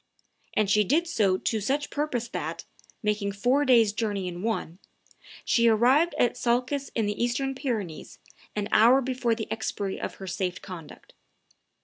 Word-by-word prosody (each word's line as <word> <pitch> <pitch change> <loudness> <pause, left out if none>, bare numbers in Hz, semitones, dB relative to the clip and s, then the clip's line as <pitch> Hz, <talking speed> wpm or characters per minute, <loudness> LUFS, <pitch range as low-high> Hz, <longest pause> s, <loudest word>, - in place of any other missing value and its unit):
And 215 -1 +2
she 210 +1 +4
did 305 - +2
so 205 - +2
to 220 +3 -1
such 280 +7 -1
purpose 275 -6 -2
that, - - -5 0.4
"making 210 -1 0
four 250 +8 +2
days' 230 -5 +5
journey 205 -4 -2
in 175 0 -6
one," 205 -5 -3 0.7
she 235 -1 +3
arrived 255 +10 +4
at 240 - +2
Salces, 255 +4 0
in 225 - +1
the 205 +3 -1
Eastern 270 +3 0
Pyrenees, 230 - -4 0.4
an 205 -1 -1
hour 240 +5 +6
before 250 -3 0
the 220 -1 -4
expiry 200 -3 -3
of - - -4
her 195 - -9
safe 180 0 -3
conduct. 170 -6 -11
225 Hz, 155 wpm, -27 LUFS, 200-255 Hz, 0.7 s, hour